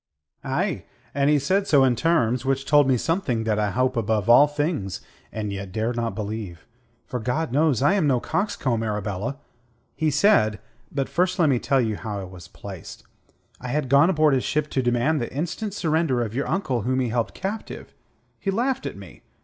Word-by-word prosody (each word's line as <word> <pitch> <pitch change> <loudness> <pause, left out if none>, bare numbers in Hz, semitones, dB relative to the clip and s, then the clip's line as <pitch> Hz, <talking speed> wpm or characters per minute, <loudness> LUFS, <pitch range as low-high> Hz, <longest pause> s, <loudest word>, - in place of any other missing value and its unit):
"Aye, 155 +5 -2 0.3
and 140 +1 +2
he 150 - +4
said 190 +8 +1
so 145 -7 +5
in 130 -2 +3
terms 125 -5 +1
which 135 0 -1
told 145 -1 +5
me 130 -2 +3
something 130 - -1
that 110 -1 0
I 105 -1 +1
hope 130 +5 0
above 110 -1 +1
all 145 +5 +8
things, 145 - -2 0.3
and 105 -2 -4
yet 100 -1 -6
dare 110 +4 -1
not 115 -1 -2
believe, 105 -6 -5 0.4
for, 125 - -4
God 125 +6 -2
knows, 145 -2 +2
I 145 - +4
am 190 -7 +2
no 130 -3 +3
coxcomb, 140 - -1
Arabella. 105 +3 -3 0.6
He 160 -1 +1
said... 140 - +3 0.3
but 135 -1 -1
first 180 +1 0
let 160 -4 +3
me 130 -3 +2
tell 135 +2 +1
you 110 -3 -1
how 105 -2 -5
I - - -5
was 90 -2 -11
placed. 95 -1 -10 0.6
I 125 - -7
had 135 +1 -1
gone 140 +5 +5
aboard 155 -5 +3
his 130 - +1
ship 150 0 -1
to 130 - +1
demand 120 +5 +1
the 120 - -4
instant 180 - -4
surrender 155 -8 +1
of 110 -2 -5
your 135 +4 -2
uncle 135 - -1
whom 130 +4 0
he 125 -2 0
held 115 0 -2
captive. 205 +3 -6 0.5
He 195 - -3
laughed 255 +6 0
at - - -7
me. - - -13
130 Hz, 200 wpm, -24 LUFS, 110-155 Hz, 0.6 s, all